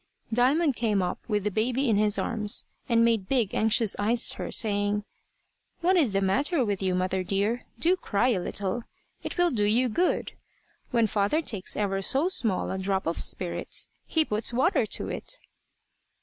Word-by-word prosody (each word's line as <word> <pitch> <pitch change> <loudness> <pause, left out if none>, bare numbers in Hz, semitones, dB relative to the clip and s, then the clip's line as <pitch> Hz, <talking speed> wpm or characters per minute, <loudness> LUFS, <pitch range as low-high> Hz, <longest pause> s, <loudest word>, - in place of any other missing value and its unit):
Diamond 270 +5 +2
came 210 -5 0
up 180 - -3
with 210 -3 -1
the 210 - -1
baby 250 +7 0
in 225 - +3
his 210 0 +3
arms 220 0 0 0.2
and 230 -1 +4
made 225 -5 0
big 240 -7 +1
anxious 220 -1 +2
eyes 230 +4 +2
at - - -7
her, - - -4
saying 205 -1 +1 0.8
"What 365 +2 +3
is 295 - +3
the 195 0 0
matter 270 - +1
with 200 -2 -2
you, 185 -1 0
mother 185 +1 -1
dear? 200 +6 -1
Do 350 +3 +3
cry 240 - 0
a 215 -7 +1
little. 195 +5 -3 0.4
It - - -6
will 350 0 +3
do 215 -5 0
you 240 +5 +2
good. 350 +11 0 0.6
When 235 -3 +2
father 210 +9 0
takes 205 -9 -1
ever 195 -2 -1
so 275 - +2
small 225 - +1
a 190 - -3
drop 190 0 -1
of 165 - -2
spirits, 180 -2 0 0.2
he 320 -1 +1
puts 215 -1 0
water 260 +10 +1
to - - -2
it." - - -4
220 Hz, 180 wpm, -26 LUFS, 200-255 Hz, 0.8 s, and